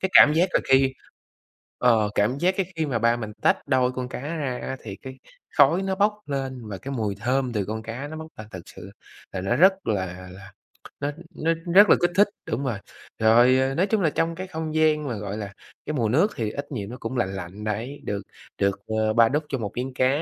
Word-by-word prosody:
Cái 190 - -1
cảm 150 - +9
giác 175 +4 +3
là - - +3
khi 135 0 +4 0.9
ờ, 110 -4 +3
cảm 110 +6 +2
giác 185 +2 +2
cái 190 -3 0
khi 160 -1 0
mà 125 -5 -1
ba 115 +1 +3
mình 110 -2 -6
tách - - +2
đôi 130 -2 +2
con 125 0 -5
cá - - -6
ra 135 -5 -3
á 135 - -4
thì 100 -3 -6
cái 130 +3 -11 0.4
khói 180 +3 +5
nó 190 0 -1
bốc 210 +2 +3
lên 130 -4 -4
và 95 - -5
cái 140 +6 -7
mùi 105 -5 -2
thơm 125 +1 0
từ 100 -3 -1
con 110 +1 -4
cá 120 +6 -6
nó 155 +1 -7
bốc 160 0 -7
ra 110 - -8
thật 95 - -7
sự 100 - -11 0.4
là 95 - -4
nó 100 +6 0
rất 190 +6 +6
là 90 -3 -3
là 100 +1 -12
c - - -37 0.5
nó 145 - -1 0.2
nó 165 +1 +1 0.2
rất 205 +1 +9
là - - +8
kích 175 - +2
thích. 205 +1 +6 0.2
Đúng 125 +5 -1
rồi, 115 -6 -1 0.4
rồi, 120 +4 +5
ờ, 135 +1 0
nói 185 +6 +2
chung 220 -3 +1
là 160 - +3
trong 165 +2 -1
cái 185 +2 -6
không 160 -3 -5
gian 155 -2 +2
mà, 120 - -2
gọi 100 0 -5
là, 100 -2 -6 0.3
cái 155 - -3
mùi 115 -6 0
nước 165 - +3
thì 110 -2 -2
ít 140 +1 -6
nhiều 105 -6 -4
nó 125 - -7
cũng 115 +3 -4
lạnh 95 -5 -1
lạnh 95 +3 -7
đấy, 115 +7 -4
được 100 -1 -3 0.4
được, 100 0 +1
ờ, 110 0 0
ba 115 0 +5
đút 150 +3 0
cho 135 - -1
một 105 -4 -4
miếng 130 +1 -3
cá, 130 0 +2
125 Hz, 245 wpm, -24 LUFS, 110-150 Hz, 0.9 s, cảm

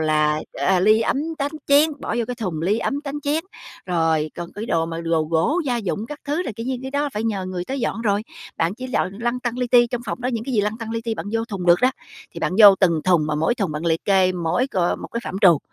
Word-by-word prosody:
là, 155 -1 +2
à, 190 -2 +1
ly, 215 +3 +5
ấm, 225 - +1 0.2
tách, 285 +1 -1
chén, 290 +3 +5
bỏ - - -3
vô 235 - +1
cái 250 - -2
thùng 180 -9 -3
ly, 205 +6 +1
ấm, 280 +4 -2
tánh, 290 0 -5
chén. 295 +3 -1 0.4
Rồi 160 -3 +1
còn 170 0 -6
cái 210 +3 -6
đồ 165 -4 +1
mà 165 0 -5
đồ 165 -1 +1
gỗ 165 - +1
gia 245 - +1
dụng 215 0 -3
các 295 +2 -8
thứ 300 +5 -1
là, 245 - -4
kiểu 230 +2 -5
như, 260 - -1
cái 265 - -5
đó 285 +1 0
phải 210 - -2
nhờ 200 -4 -1
người 180 -1 -4
tới 270 +6 -4
dọn 230 - -2
rồi. 205 -1 +1 0.3
Bạn 165 +4 0
chỉ 255 +2 -7
dọn 190 -6 -1
lăn 240 +1 -1
tăn 240 0 -3
li 250 - 0
ti, 240 0 +5
trong 240 0 -4
phòng - - -4
đó 250 - -2
những 230 -1 -3
cái 260 -1 -3
gì 210 - +4
lăn 210 +3 -2
tăn 225 -1 -6
li 230 - -2
ti 230 - -1
bạn - - -6
vô 225 0 0
thùng 195 -6 -5
được 175 0 +5
đó, 255 +1 +4 0.4
thì - - -7
bạn - - 0
vô 200 -2 +10
từng 170 -4 +3
thùng 175 -5 +3
mà 150 - -1
mỗi 160 +10 +1
thùng 195 -9 -2
bạn 155 +3 -4
liệt 165 0 0
kê 190 -2 +3
mỗi 180 +8 0
c - - -22
một 175 -2 0
cái 235 - -2
phạm - - -5
trù, 175 -7 +6
210 Hz, 285 wpm, -22 LUFS, 170-245 Hz, 0.4 s, vô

